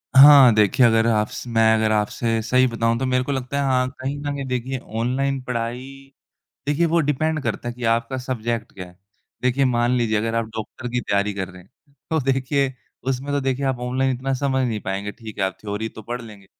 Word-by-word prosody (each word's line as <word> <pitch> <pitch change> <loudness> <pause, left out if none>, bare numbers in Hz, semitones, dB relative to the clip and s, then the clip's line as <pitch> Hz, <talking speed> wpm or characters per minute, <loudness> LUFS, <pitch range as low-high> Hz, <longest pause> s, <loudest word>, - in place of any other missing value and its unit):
हाँ, 135 -3 +9
देखिए 105 +4 +4
अगर 115 -1 +4
आप 105 -2 +2
स - - -7
मैं 115 -1 +4
अगर 110 0 +1
आपसे 110 +2 0
सही 125 +3 +3
बताऊँ 115 -1 0
तो 130 - -1
मेरे 125 0 +1
को 140 - -3
लगता 135 +1 -3
है - - 0
हाँ, 130 -2 +2
कहीं 135 +2 -3
न 145 0 -3
कहीं 140 -1 -4
देखिए 125 +1 -2 0.2
ऑनलाइन 135 +3 0
पढ़ाई 125 +3 -5 0.5
देखिए 150 +4 +2
वो 170 +1 +2
डिपेंड 155 +1 0
करता 120 - -3
है 120 - -5
कि 125 -1 -8
आपका 115 +3 +1
सब्जेक्ट 120 -3 -3
क्या 90 -2 -8
है? 90 0 -17 0.5
देखिए, 130 +2 +2
मान 120 -1 +2
लीजिए 115 -3 +1
अगर 115 +1 -2
आप 115 - +1
डॉक्टर 125 +3 -6
की 125 - 0
तैयारी 100 -2 0
कर 95 -3 -3
रहे 90 0 -13
हैं, 95 - -25 0.4
तो 160 -1 +2
देखिए 135 +1 0 0.4
उसमें 135 +2 -2
तो 145 - +1
देखिए 135 +1 -1
आप 130 -2 0
ऑनलाइन 130 +2 0
इतना 135 +2 -3
समझ 130 0 0
नहीं 110 -3 -2
पाएँगे, 100 +2 -3
ठीक 110 -2 -11
है, 95 - +1
आप 95 -1 -2
थ्योरी 105 +1 -4
तो 110 - -11
पढ़ 120 +3 -5
लेंगे। 105 -4 -13
125 Hz, 220 wpm, -22 LUFS, 110-135 Hz, 0.5 s, हाँ